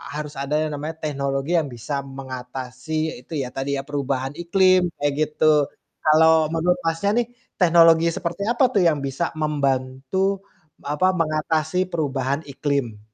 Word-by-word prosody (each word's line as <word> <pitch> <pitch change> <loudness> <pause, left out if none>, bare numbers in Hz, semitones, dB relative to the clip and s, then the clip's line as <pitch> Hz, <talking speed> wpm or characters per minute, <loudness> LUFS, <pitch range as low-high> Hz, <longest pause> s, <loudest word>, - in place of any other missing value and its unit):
harus 150 0 -5
ada 140 +1 -5
yang 155 -1 -1
namanya 155 +3 -5
teknologi 140 +2 -1
yang 155 -4 +1
bisa 120 +5 -6
mengatasi 130 +2 -5
itu 165 - -11
ya, 125 - -5
tadi 140 +1 -1
ya, - - -2
perubahan 135 -1 -2
iklim, 185 0 +3
kayak 145 -1 +1
gitu. 155 -1 +3 0.3
Kalau 160 0 +5
menurut 170 +2 +2
Masnya 165 +5 0
nih, - - -15 0.3
teknologi 165 -1 +6
seperti 170 +3 -4
apa 245 +2 +2
tuh 195 -4 +3
yang 155 -4 +3
bisa 140 +5 -2
membantu, 145 +6 0 0.4
apa, 150 +6 +1
mengatasi 160 +2 0
perubahan 140 -3 -1
iklim? 135 -7 -2
150 Hz, 140 wpm, -23 LUFS, 135-165 Hz, 0.4 s, teknologi